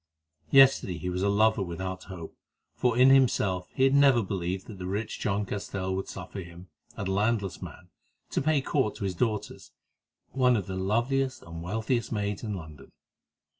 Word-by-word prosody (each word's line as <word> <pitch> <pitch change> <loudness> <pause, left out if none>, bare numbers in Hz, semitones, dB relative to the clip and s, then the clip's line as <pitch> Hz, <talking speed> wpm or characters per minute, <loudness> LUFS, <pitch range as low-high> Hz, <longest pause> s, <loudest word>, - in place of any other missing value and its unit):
Yesterday 135 -10 +5
he 90 +1 -4
was 90 +1 -2
a 100 - +2
lover 110 +1 +3
without 95 +1 -5
hope, 90 -4 -9 0.4
for 120 -2 0
in 130 +2 +7
himself 105 -9 +3
he 130 - +2
had 135 0 +4
never 140 -4 +5
believed 95 0 -3
that 105 -4 -10
the 90 - -5
rich 105 +3 -3
John 100 0 -1
Castell 95 -1 -3
would 95 - -3
suffer 95 +1 -7
him, 85 +1 -12 0.3
a 100 - -3
landless 100 +1 0
man, 90 0 -10 0.4
to - - 0
pay 150 0 +2
court 130 -5 0
to - - -7
his 95 -2 -1
daughter, 105 +2 -2 0.7
one 125 -2 +3
of 100 - -3
the 95 - -5
loveliest 120 +8 0
and 85 0 -8
wealthiest 110 +6 -2
maids 105 -2 -2
in 105 -3 -3
London. 80 -5 -11
100 Hz, 175 wpm, -28 LUFS, 95-120 Hz, 0.7 s, in